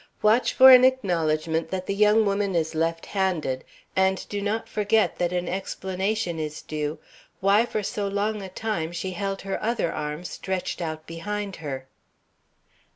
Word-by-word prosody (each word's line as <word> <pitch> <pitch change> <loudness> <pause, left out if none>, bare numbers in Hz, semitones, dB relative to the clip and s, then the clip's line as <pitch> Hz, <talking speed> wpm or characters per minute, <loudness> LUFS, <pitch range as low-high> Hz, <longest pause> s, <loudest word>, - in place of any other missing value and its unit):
Watch 220 +4 +4
for 260 0 +9
an 255 -1 +9
acknowledgment 165 -10 +1
that 185 0 -3
the - - -1
young 210 +2 +4
woman 200 -1 0
is 160 -1 0
left 165 +1 -1
handed, 175 -10 -1 0.3
and 190 0 +1
do 205 -1 -3
not 210 +3 -2
forget 215 +1 +1
that 175 -1 +1
an 180 -1 -1
explanation 190 -1 -2
is 150 -1 -5
due 150 0 -3 0.4
why 200 +4 +4
for 215 - -2
so 200 +1 -2
long 205 +2 -1
a 190 - -7
time 180 -5 -3
she 185 +2 -3
held 195 +1 -3
her 195 0 -3
other 220 -7 0
arm 150 +3 -4
stretched 185 0 -4
out 155 -1 -4
behind 200 +4 -5
her. 135 -4 -5
190 Hz, 160 wpm, -25 LUFS, 165-210 Hz, 0.4 s, for